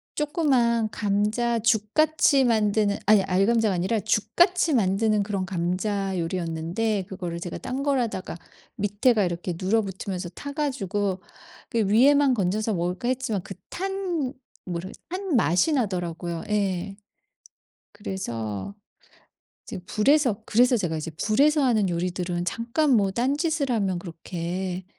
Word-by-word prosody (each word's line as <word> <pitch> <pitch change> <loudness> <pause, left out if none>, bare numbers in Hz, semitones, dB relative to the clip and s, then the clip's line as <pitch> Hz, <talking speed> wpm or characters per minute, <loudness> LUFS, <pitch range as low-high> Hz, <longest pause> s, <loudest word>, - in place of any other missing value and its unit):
쪼끄만 255 -8 +1
감자죽같이 230 +8 +2
만드는 210 -3 +2
아니 210 -1 +6
알감자가 200 +3 +2
아니라 190 +6 0
죽같이 265 - +2
만드는 210 -1 +2
그런 195 -2 -2
감자 190 +2 -2
요리였는데 170 +5 -2
그거를 175 -3 -5
제가 175 0 -6
딴 260 +2 -4
걸 280 -2 +2
하다가 220 -8 -3 0.4
밑에가 205 +2 +2
이렇게 175 0 -2
눌어 210 +5 +2
붙으면서 190 -2 -5
타 285 +11 -8
가지고 205 - -2 0.5
'그 230 -4 +1
위에만 270 +6 +5
건져서 210 +1 0
먹을까.' 180 +6 -2
했지만 235 -7 -1
그 195 - -8 0.2
탄 360 -7 -3 0.3
뭐라 175 0 -4 0.2
탄 370 -2 -2
맛이 205 - +3
나더라고요. 175 - -2
예. 195 -2 -1 1.0
그래서 120 - -5 0.9
이제 - - -7
불에서 245 -2 +2
그래서 245 +2 +4
제가 175 -6 -2
이제 155 +2 -4
불에서 285 - +3
하는 215 -6 +2
요리들은 175 0 -2
잠깐 235 - 0
뭐 200 -3 +3
딴짓을 280 - 0
하면 195 -6 0
그렇게 175 +2 -5
210 Hz, 295 characters per minute, -25 LUFS, 185-250 Hz, 1.0 s, 아니